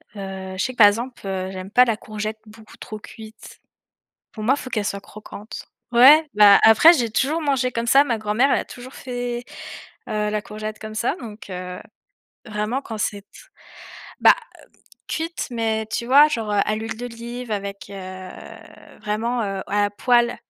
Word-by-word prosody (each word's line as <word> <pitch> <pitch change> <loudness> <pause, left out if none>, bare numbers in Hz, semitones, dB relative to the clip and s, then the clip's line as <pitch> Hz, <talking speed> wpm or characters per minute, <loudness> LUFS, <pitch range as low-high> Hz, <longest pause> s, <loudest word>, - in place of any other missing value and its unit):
Heu, 190 -1 -7
je 190 - 0
sais 255 - -2
que - - -22
par 210 -3 +9
exemple, 235 +5 -2
heu, 190 -1 -3
j'aime 185 +1 -8
pas 250 +3 +6
la 230 -3 0
courgette 215 0 -6
beaucoup 215 0 -16
trop 215 - -8
cuite. 220 +1 -13 0.7
Pour 215 - -8
moi, 260 +5 +4
il - - -7
faut 255 - -8
qu'elle 210 -3 -1
soit 200 0 -3
croquante. 215 +1 -10 0.3
Ouais, 290 +6 +8
bah, 205 -1 +8
après 265 +10 +8
j'ai 240 -7 -1
toujours 295 +9 0
mangé 270 -3 +1
comme 230 0 -3
ça, 275 +4 +6
ma 250 -5 -1
grand-mère, 220 +5 +1
elle - - +3
a - - -6
toujours 250 +2 -11
fait, 245 -1 -5 0.6
heu, 210 0 -1
la 210 0 -2
courgette 215 0 -7
comme 215 0 -8
ça 235 +8 -1
donc, 220 -3 -10
heu, 180 0 -6 0.7
vraiment 215 +5 -3
quand 220 -2 -7
c'est 205 -1 -2
t 200 - -52 0.9
bah, - - +8 0.7
cuite 330 +1 -3
mais 220 -2 -1
tu 220 +2 -3
vois 285 +4 +7
genre 225 -8 -3
à 205 +1 +1
l'huile 220 +1 -5
d'olive 240 0 -7
avec, 200 -1 -5
heu, 185 -1 -8 0.7
vraiment, 230 +3 -2
heu, 195 -1 -4
à 205 +1 +1
la 205 - +1
poêle. 240 +2 +2
220 Hz, 180 wpm, -22 LUFS, 205-245 Hz, 0.9 s, par